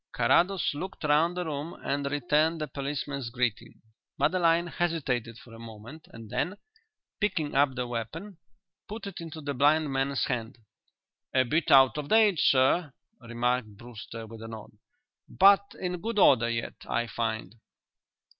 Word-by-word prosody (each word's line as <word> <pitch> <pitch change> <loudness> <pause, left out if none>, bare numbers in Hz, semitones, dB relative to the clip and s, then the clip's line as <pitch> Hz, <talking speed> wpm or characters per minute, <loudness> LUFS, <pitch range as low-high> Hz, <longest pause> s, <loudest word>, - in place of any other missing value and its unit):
Carrados 170 +12 +2
"looked" 185 +6 -7
round 155 +4 +2
the 180 - -2
room 155 +1 -5
and 140 0 -1
returned 150 +4 +1
the 155 - -3
policeman's 140 -2 -4
greeting. 120 -2 -3 0.4
Madeline 170 -2 +2
hesitated 140 -10 -2
for 115 0 -15
a 115 - -11
moment, 115 +7 -11
and 115 -1 -12
then, 175 +11 -2 0.6
picking 165 -8 -1
up 140 -1 +3
the 125 -1 -2
weapon, 140 - -6 0.5
put 215 +1 -7
it 195 -4 -7
into 160 -1 -8
the 145 -1 -3
blind 145 +2 +2
man's 135 0 0
hand. 120 -4 -4 0.8
"A 130 - +5
bit 155 +6 0
out 135 +1 +6
of 145 - -6
date, 215 -6 +4
sir," 135 +5 +3 0.3
remarked 120 -2 -2
Brewster, 115 -1 -9
with 110 0 -11
a 115 - -7
nod. 110 -1 -9 0.6
"But 200 +1 +4
in 180 -2 -3
good 225 +1 -3
order 125 - +5
yet, 115 0 -3 0.2
I 120 - 0
find." 110 -1 -3
140 Hz, 150 wpm, -28 LUFS, 120-165 Hz, 0.8 s, out